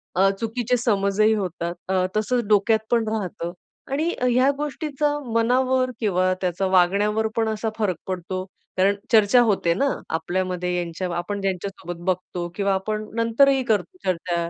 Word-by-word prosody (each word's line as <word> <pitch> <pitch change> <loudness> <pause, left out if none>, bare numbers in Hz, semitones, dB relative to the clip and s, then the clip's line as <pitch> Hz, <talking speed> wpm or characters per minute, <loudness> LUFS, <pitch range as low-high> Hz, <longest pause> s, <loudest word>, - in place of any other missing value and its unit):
अ, 195 +1 +5
चुकीचे 240 +2 0
समजही 215 -2 +2
होतात. 175 -4 -3
अ, 185 -1 +2
तसंच 235 +3 +1
डोक्यात 215 +1 +4
पण 230 -2 +2
राहतं 185 -5 -3 0.4
आणि 310 +5 0
अ, 250 - -2
ह्या 255 +2 +4
गोष्टींचा 295 0 -1 0.2
मनावर 255 +2 +2
किंवा 185 -4 +2
त्याचा 180 +1 -1
वागण्यावर 200 +4 +3
पण 225 -1 +1
असा 220 +1 -2
फरक 205 -5 0
पडतो, 185 0 -3 0.3
कारण 195 +2 +3 0.2
चर्चा 220 +2 +6
होते 190 -5 +2
ना 275 +11 +1 0.3
आपल्यामध्ये 180 +1 -1
यांच 170 -1 -4
आपण 180 +3 -3
ज्यांच्यासोबत 190 -2 -4
बघतो 180 -1 -2
किंवा 200 0 +1
आपण 215 +3 -2
नंतरही 260 +4 +3
करतो 230 - -1
चर्चा, 170 -1 -1
205 Hz, 145 wpm, -23 LUFS, 185-230 Hz, 0.4 s, चर्चा